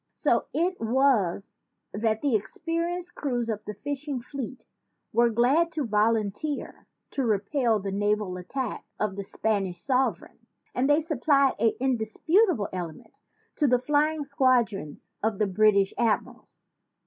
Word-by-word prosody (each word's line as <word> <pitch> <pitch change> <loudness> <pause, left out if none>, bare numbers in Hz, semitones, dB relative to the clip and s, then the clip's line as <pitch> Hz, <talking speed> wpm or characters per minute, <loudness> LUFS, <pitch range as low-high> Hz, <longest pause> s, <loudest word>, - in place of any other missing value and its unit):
So - - +1
it 355 +4 0
was 225 -6 +1 0.4
that 220 +2 0
the 280 -4 +2
experienced 335 - -3
crews 245 -5 -2
of 215 -1 -3
the 210 - -6
fishing 285 +4 -4
fleet 260 +1 -7 0.5
were 235 0 +4
glad 265 +9 +3
to 300 -3 -1
volunteer 220 +6 -1 0.2
to 275 - -1
repel 225 +2 +1
the 195 0 -4
naval 205 -1 0
attack 255 +9 -4 0.2
of 210 -2 -1
the 200 - -4
Spanish 195 -3 -1
sover 260 +7 0
eign; - - -32 0.3
and 260 +3 +1
they 295 +2 +4
supplied 280 -3 +2
an 225 0 +3
indisputable 265 - +2
element 175 -4 -7 0.4
to 295 - +3
the 250 -1 +4
flying 295 +4 +1
squadrons 250 - 0
of 220 -1 0
the 210 - +2
British 200 0 +3
ad 230 -3 +3
mirals." - - -18
240 Hz, 140 wpm, -27 LUFS, 210-285 Hz, 0.5 s, were